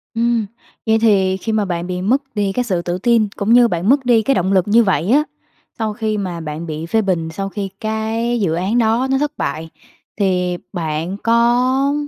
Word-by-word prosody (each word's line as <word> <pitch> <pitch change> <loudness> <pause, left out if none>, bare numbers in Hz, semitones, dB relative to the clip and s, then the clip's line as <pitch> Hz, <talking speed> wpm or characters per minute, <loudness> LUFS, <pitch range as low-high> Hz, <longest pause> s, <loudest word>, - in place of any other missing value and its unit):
Ừm, 230 -1 +1 0.4
vậy 220 -1 +3
thì 190 -4 +3
khi 220 +4 -4
mà 215 -1 +1
bạn 175 -2 -3
bị 180 0 -3
mất 245 +9 +2
đi 205 -2 0
cái 250 +5 -1
sự 190 -8 -1
tự 175 +1 -3
tin, 225 +2 +2
cũng 210 +2 +1
như 240 0 +6
bạn 175 -1 -1
mất 270 0 +3
đi 235 -2 +4
cái 270 +5 +1
động 190 -1 +1
lực 185 -1 +2
như 230 +3 +5
vậy 180 -3 0
á, 295 +3 +5 0.6
sau 220 -1 -1
khi 215 0 -2
mà 180 -4 -4
bạn 155 +1 -6
bị 155 0 -5
phê 220 +6 +1
bình, 175 -5 -1
sau 195 +3 -4
khi 195 -1 -4
cái 220 +2 -1
dự 175 -5 +1
án 190 +7 0
đó 235 +2 +2
nó 270 - +3
thất 295 +1 -1
bại 155 +3 -3 0.5
thì 180 -3 0 0.2
bạn 165 +1 -3
có 250 +4 +2
210 Hz, 215 wpm, -18 LUFS, 180-235 Hz, 0.6 s, như